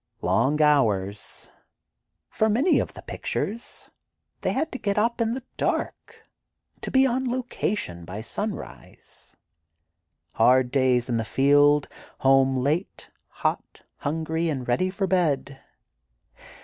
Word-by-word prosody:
Long 120 - +2
hours. 105 -9 +1 0.8
For 220 - 0
many 255 - +3
of - - -3
the - - -10
pictures, 230 +4 -5 0.5
they - - 0
had 310 +4 -1
to 255 - -6
get 200 0 -1
up 230 +2 +1
in 230 +1 0
the 260 - -6
dark, - - -3 0.5
to - - -5
be 265 0 +4
"on 260 0 0
location" 215 - -3
by 95 +5 -7
sunrise. 110 - -7 1.0
Hard 125 0 +3
days 130 -3 +2
in 120 -2 0
the 115 - -1
field, 145 +4 +4 0.3
home 135 0 +3
late, 150 +8 -2 0.2
hot, - - -3
hungry 160 +2 -2
and 135 -5 -3
ready 185 +10 +1
for 195 +1 -2
bed. 155 -7 0
145 Hz, 125 wpm, -25 LUFS, 125-210 Hz, 1.0 s, be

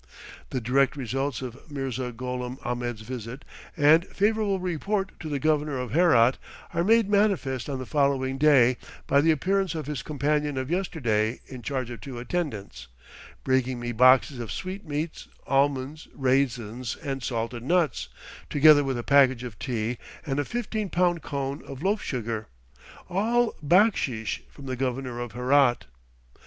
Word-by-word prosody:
The 130 - -2
direct 135 +4 +2
results 135 0 -2
of 130 +5 -9
Mirza 130 -3 -3
Gholam 125 +1 -5
Ahmed's 120 -2 -3
visit 120 +2 -7 0.3
and 155 +3 +6
favorable 205 -1 +1
report 190 +3 -2
to 155 - -6
the 145 - -1
Governor 150 -1 +1
of 125 -1 -4
Herat, 135 -7 +4 0.3
are 170 0 +1
made 225 +2 +4
manifest 195 - +1
on 135 - -2
the 130 - -5
following 135 -2 +1
day 130 -5 +5 0.3
by 140 +1 +4
the 160 - +3
appearance 185 +3 +1
of 155 -3 -4
his 150 -1 -4
companion 150 0 -1
of 130 +3 -3
yesterday 120 - 0
in 130 -2 -9
charge 130 0 -3
of 120 - -8
two 130 -3 -7
attendants, 120 - -4 0.6
bringing 130 -1 +1
me 120 0 -3
boxes 130 +3 +5
of 115 -2 -5
sweetmeats, 170 -4 -5 0.2
almonds, 140 +2 0
raisins, 125 -3 0
and 135 -2 -3
salted 120 -1 -3
nuts, 160 0 +1 0.4
together 145 0 +6
with 135 -2 -2
a 120 - -4
package 130 -3 +4
of 120 -5 -8
tea 120 -2 -2 0.3
and 140 -1 -1
a 145 - 0
fifteen 220 - -3
pound 175 -1 +1
cone 140 0 -4
of 135 +2 -8
loaf 205 +2 +1
sugar; 115 -4 -3 0.6
all 225 +6 +1
backsheesh 145 - +2
from 140 - -13
the 130 -1 -3
Governor 125 -1 -3
of 120 -3 -5
Herat. 125 +1 +3
135 Hz, 150 wpm, -26 LUFS, 125-155 Hz, 0.6 s, and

